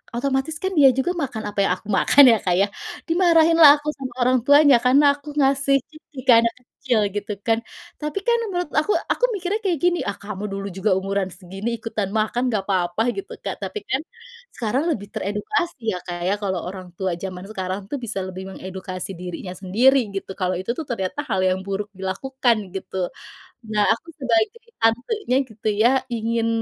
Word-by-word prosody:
otomatis 270 +4 -1
kan 380 0 -2
dia 285 -4 +7
juga 310 +7 +1
makan 270 -10 -4
apa 205 -1 -4
yang 195 - +2
aku 200 - -18
makan 195 +8 +6
ya 225 - +4
Kak 180 -2 +1
ya, 200 +2 +3 0.4
dimarahinlah 330 -2 +6
aku 295 - -12
sama 260 -3 -7
orang 255 0 +4
tuanya 285 +1 +7
karena 280 +3 +5
aku 290 +1 -12
ngasih 275 0 +3
ciki 310 -2 -14
ke 255 - +7
anak 230 0 +1
kecil 250 -1 -2 0.2
gitu 205 0 -3 0.2
kan, 225 -1 +4 0.4
tapi 300 +5 -2
kan 475 - +5
menurut 355 -3 -2
aku 305 +7 +2 0.2
aku - - -1
mikirnya 390 +1 -1
kayak 355 -5 +1
gini, 350 0 +2
ah, 200 - -1
kamu 205 -1 -6
dulu 195 0 -4
juga 195 +3 -1
umuran 195 0 -2
segini 195 +5 -6
ikutan 215 -3 -3
makan 220 +3 0
nggak 210 -3 0
apa-apa 180 0 0 0.2
gitu 395 +1 -6
Kak - - -4
tapi 425 - -4
kan, 265 - +1 0.5
sekarang 245 +7 -1
lebih 205 -4 -7
teredukasi 225 - -2
ya - - -3
Kak 175 -1 -5
ya 200 - +2
kalau 190 -4 -1
orang 185 -2 -9
tua 185 -3 -2
jaman 185 0 -6
sekarang 190 -2 -3
tuh 285 - -2
bisa 215 -5 -3
lebih 185 0 -6
mengedukasi 185 0 -6
dirinya 180 +1 -6
sendiri 230 +9 +4 0.2
gitu 195 - -4
kalau 185 -1 0
itu 185 +5 -2
tuh 320 - -4
ternyata 210 0 -3
hal 190 -4 +1
yang 185 0 +2
buruk 200 +1 -3
dilakukan 235 +6 0 0.2
gitu, 190 -1 -3 0.6
nah 210 -1 +2
aku 280 - -15
sebagai 240 - +1 0.2
tantenya 250 - +1
gitu 220 -1 -5
ya 235 - +6 0.2
ingin, 230 0 0
225 Hz, 185 wpm, -22 LUFS, 195-280 Hz, 0.6 s, dia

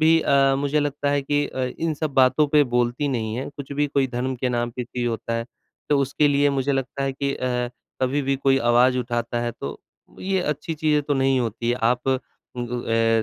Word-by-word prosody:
भी 160 +1 +5
अ, 135 -2 +3
मुझे 145 +2 +1
लगता 145 0 -1
है 145 -1 +1
कि 145 +1 0
अ, 130 - -3
इन 165 -1 0
सब 150 -1 -3
बातों 130 +3 +4
पे 150 0 +5
बोलती 125 +4 +1
नहीं 110 -4 -2
है, 130 - -4
कुछ 140 0 -7
भी 145 +1 +1
कोई 140 -1 +1
धर्म 130 +1 -2
के 125 +1 -1
नाम 120 -1 -1
पे 125 - -2
पी 120 0 -4
होता 115 0 -2
है। 115 - -2 0.4
तो 145 -1 +3
उसके 140 +2 +2
लिए 145 0 +3
मुझे 140 0 0
लगता 135 0 -2
है 135 - -1
कि 140 +1 -2
अ, 125 -1 -1 0.3
कभी 140 +3 +1
भी 135 0 0
कोई 135 0 +3
आवाज़ 125 +2 +4
उठाता 120 -1 -2
है 120 0 -2
तो - - -5 0.4
ये 190 0 0
अच्छी 150 0 -2
चीज़ें 150 -1 +1
तो 145 0 -1
नहीं 135 -1 +2
होती 115 0 -2
है। 120 - +2
आप 125 +3 +1
उ 130 - +3 0.4
ग 120 0 -3
ए 115 0 +3
135 Hz, 225 wpm, -23 LUFS, 120-145 Hz, 0.4 s, भी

